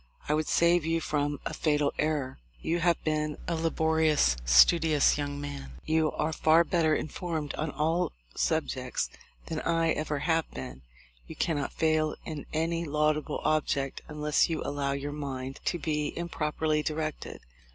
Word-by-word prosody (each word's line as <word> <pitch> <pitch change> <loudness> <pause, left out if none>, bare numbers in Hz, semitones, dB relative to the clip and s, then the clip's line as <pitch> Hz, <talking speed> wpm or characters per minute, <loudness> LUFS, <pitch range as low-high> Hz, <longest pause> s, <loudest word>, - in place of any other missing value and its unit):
I 150 - +2
would 155 0 0
save 170 0 +4
you 165 +1 +1
from 145 -2 -1
a - - -3
fatal 150 -2 +1
error. 145 - -1 0.2
You 170 +2 -1
have 170 -1 +2
been 150 -1 -1
a 170 - 0
laborious, 160 - +2
studious 150 - +5
young 145 -1 -3
man. 140 - -6
You 160 0 +2
are 155 +1 -1
far 160 +2 +5
better 160 -2 +2
informed 155 -2 -3
on 155 - -2
almost 160 +4 0
all - - -32
subjects - - -1 0.3
than 160 -1 -3
I 165 -1 +2
ever 150 -1 -1
have 165 +2 0
been. 65 0 -8 0.5
You - - -8
cannot 145 -4 -1
fail 155 -1 +1
in 155 -3 -6
any 165 +2 0
laudable 150 -1 0
object 140 -3 0
unless 150 0 +1
you 165 - -2
allow 140 -1 -1
your 140 +1 -3
mind 135 -2 -5
to 175 - +1
be 150 -3 -2
improperly 155 -2 -1
directed. 155 0 -4
155 Hz, 155 wpm, -29 LUFS, 145-160 Hz, 0.5 s, studious